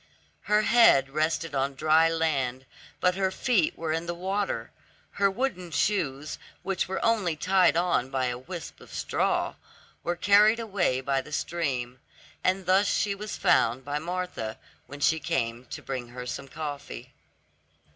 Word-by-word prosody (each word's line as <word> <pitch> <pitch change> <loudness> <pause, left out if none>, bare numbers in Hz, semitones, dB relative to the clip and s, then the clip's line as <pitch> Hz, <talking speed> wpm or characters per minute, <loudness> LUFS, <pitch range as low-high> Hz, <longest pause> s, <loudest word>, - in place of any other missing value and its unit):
Her 210 0 +3
head 210 - +5
rested 155 +1 -1
on 135 0 0
dry 155 +3 +4
land, 135 -6 -1 0.3
but 180 0 +3
her 190 0 0
feet 190 -3 +1
were 160 -1 -2
in 165 +1 -2
the 175 - -2
water; 195 +3 -2 0.4
her 200 0 +2
wooden 195 -5 -2
shoes, 155 -6 -1 0.2
which 195 -2 -1
were 190 - -2
only 210 -8 +2
tied 185 +1 +3
on 170 -7 +1
by 135 -1 0
a 125 -1 -2
wisp 170 +5 -8
of - - -14
straw, - - 0 0.5
were 175 - -1
carried 210 +4 +5
away 195 - 0
by 135 0 0
the 155 - -13
stream, 130 -7 -2 0.4
and 185 0 +1
thus 190 +3 +4
she 205 -2 +1
was 210 +1 -6
found 125 +3 +2
by 145 +1 -2
Martha 175 -10 -4 0.3
when 145 +1 -10
she 160 +2 +3
came 120 -4 -2
to - - -8
bring 130 -3 -4
her 125 +1 -8
some 135 +2 -5
coffee. 145 0 -7
165 Hz, 155 wpm, -27 LUFS, 135-190 Hz, 0.5 s, head